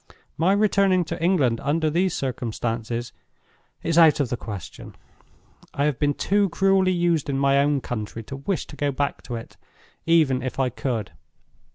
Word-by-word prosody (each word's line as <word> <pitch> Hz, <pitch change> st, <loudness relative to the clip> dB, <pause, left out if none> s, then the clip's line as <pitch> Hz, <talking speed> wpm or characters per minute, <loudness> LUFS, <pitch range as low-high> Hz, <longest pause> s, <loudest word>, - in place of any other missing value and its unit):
My 175 Hz, +5 st, +2 dB
returning 200 Hz, -3 st, +3 dB
to 165 Hz, +1 st, -5 dB
England 140 Hz, -11 st, +2 dB
under 155 Hz, +3 st, 0 dB
these 180 Hz, +2 st, +1 dB
circumstances 120 Hz, -2 st, -3 dB, 0.7 s
is 165 Hz, 0 st, +2 dB
out 160 Hz, -2 st, +6 dB
of 140 Hz, -4 st, 0 dB
the 120 Hz, -, -1 dB
question. 105 Hz, -6 st, -8 dB, 0.8 s
I 140 Hz, -, +1 dB
have 150 Hz, -4 st, -1 dB
been 145 Hz, -1 st, +1 dB
too 200 Hz, 0 st, +1 dB
cruelly 190 Hz, +1 st, +3 dB
used 170 Hz, -4 st, +1 dB
in 135 Hz, -, 0 dB
my 140 Hz, 0 st, +3 dB
own 140 Hz, -1 st, +2 dB
country 115 Hz, -1 st, -5 dB
to 135 Hz, +5 st, -8 dB
wish 175 Hz, +7 st, -2 dB
to -, -, -12 dB
go 145 Hz, 0 st, -1 dB
back 140 Hz, +1 st, -2 dB
to 125 Hz, -, -6 dB
it, 115 Hz, -, -9 dB, 0.5 s
even 155 Hz, -6 st, +3 dB
if 130 Hz, 0 st, -5 dB
I 130 Hz, -1 st, +2 dB
could. 120 Hz, -3 st, -3 dB
145 Hz, 170 wpm, -24 LUFS, 125-170 Hz, 0.8 s, out